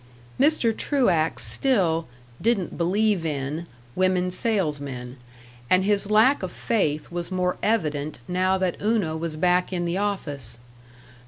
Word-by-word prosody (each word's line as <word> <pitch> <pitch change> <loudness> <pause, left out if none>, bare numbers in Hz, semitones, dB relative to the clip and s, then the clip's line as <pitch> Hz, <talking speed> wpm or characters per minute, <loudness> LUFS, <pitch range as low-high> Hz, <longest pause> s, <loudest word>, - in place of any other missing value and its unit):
Mr. 270 -6 +4
Truax 185 - +1
still 180 -12 +1 0.3
"didn't 220 -5 0
believe 195 +2 +1
in" 150 +2 -3 0.3
women 185 -1 +1
salesmen, 145 - -2 0.5
and 185 0 +4
his 205 0 +1
lack 225 +7 +4
of 185 -2 -4
faith 155 -11 -1
was 175 0 -4
more 180 -1 0
evident 155 -9 0
now 185 +1 +1
that 185 -2 -2
Una 205 -7 +1
was 160 -1 -4
back 180 +3 +2
in 175 -2 -1
the 175 +3 -1
office. 145 - -3
180 Hz, 130 wpm, -24 LUFS, 160-205 Hz, 0.5 s, Mr